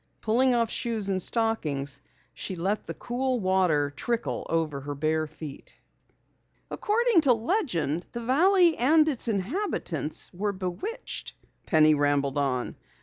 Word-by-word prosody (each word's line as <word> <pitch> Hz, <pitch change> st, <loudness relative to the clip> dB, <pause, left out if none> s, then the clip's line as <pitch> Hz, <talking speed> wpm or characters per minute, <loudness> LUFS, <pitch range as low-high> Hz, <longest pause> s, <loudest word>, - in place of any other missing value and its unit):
Pulling 245 Hz, +3 st, +2 dB
off 230 Hz, -2 st, +1 dB
shoes 220 Hz, -4 st, -1 dB
and 190 Hz, -1 st, 0 dB
stockings, 155 Hz, -, 0 dB, 0.3 s
she 190 Hz, -, -4 dB
let 195 Hz, +5 st, -2 dB
the -, -, -4 dB
cool 255 Hz, +1 st, -2 dB
water 180 Hz, -7 st, +2 dB
trickle 235 Hz, -1 st, -2 dB
over 155 Hz, -4 st, -1 dB
her 145 Hz, +1 st, -5 dB
bare 155 Hz, +2 st, 0 dB
feet. 150 Hz, -2 st, -10 dB, 0.9 s
"According 450 Hz, -3 st, +2 dB
to 275 Hz, -5 st, +5 dB
legend, 225 Hz, -, -1 dB
the 235 Hz, -, -5 dB
valley 340 Hz, +7 st, +4 dB
and 305 Hz, +5 st, +4 dB
its 270 Hz, -6 st, -1 dB
inhabitants 200 Hz, -, -2 dB
were 200 Hz, +3 st, -2 dB
bewitched," 200 Hz, -, -5 dB, 0.3 s
Penny 155 Hz, -1 st, +5 dB
rambled 145 Hz, -1 st, +1 dB
on. 130 Hz, -3 st, -1 dB
200 Hz, 130 wpm, -27 LUFS, 155-255 Hz, 0.9 s, to